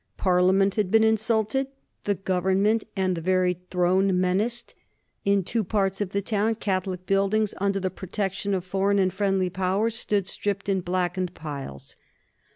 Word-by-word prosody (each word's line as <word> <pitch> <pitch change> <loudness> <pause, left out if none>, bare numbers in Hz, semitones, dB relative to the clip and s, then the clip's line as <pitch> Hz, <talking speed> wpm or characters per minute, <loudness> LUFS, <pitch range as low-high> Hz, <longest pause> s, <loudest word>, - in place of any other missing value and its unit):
Parliament 185 +1 +3
had 205 -3 0
been 220 +2 +5
insulted, 220 +3 +1 0.4
the 205 - +1
Government 190 +4 +1
and 185 -2 +1
the 165 - -4
very 180 0 +1
Throne 185 +1 +2
menaced. 210 +7 0 0.5
In 200 -1 +3
two 225 +5 -1
parts 195 0 0
of 200 - -1
the 200 +1 -2
town 215 +2 +1
Catholic 185 -3 -2
buildings, 200 +2 +1
under 195 0 +1
the 185 -1 -2
protection 195 +1 -2
of 185 -1 -3
foreign 195 +2 +1
and 185 -2 +2
friendly 195 -2 0
Powers, 190 +5 0
stood 205 -5 0
stripped 200 +1 -3
and 190 -2 0
blackened 180 0 -1
piles. 140 - -7
195 Hz, 155 wpm, -25 LUFS, 185-205 Hz, 0.5 s, been